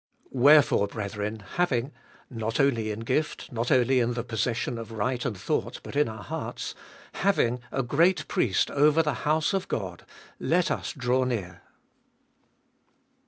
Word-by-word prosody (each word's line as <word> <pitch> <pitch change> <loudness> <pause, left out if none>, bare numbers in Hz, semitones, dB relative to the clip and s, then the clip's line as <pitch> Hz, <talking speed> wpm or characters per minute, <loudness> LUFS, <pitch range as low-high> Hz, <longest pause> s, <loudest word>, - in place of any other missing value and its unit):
Wherefore, 140 -5 +5
brethren, 105 +1 -4 0.2
having, 140 -7 +1 0.4
—not 115 -2 -3
only 120 -6 +2
in 105 +1 -4
gift, 150 +6 -2
not 120 0 -2
only 130 +1 +4
in 120 0 +1
the 120 - -2
possession 120 0 -2
of 115 0 -8
right 120 +3 -1
and 110 -6 -3
thought, - - -2
but - - -9
in 145 -4 +3
our 110 -2 -8
hearts, - - -5 0.2
— - - -22 0.2
having 125 -11 +2
a 135 - -1
great 165 +9 +2
Priest 100 -7 +1
over 150 +3 +4
the 150 -2 0 0.2
house 155 +4 +2
of 195 -1 -1
God, 90 -5 -4 0.4
let 175 +1 +1
us - - -2
draw 130 -1 +1
near. 95 -9 -3
120 Hz, 155 wpm, -27 LUFS, 110-145 Hz, 0.4 s, Wherefore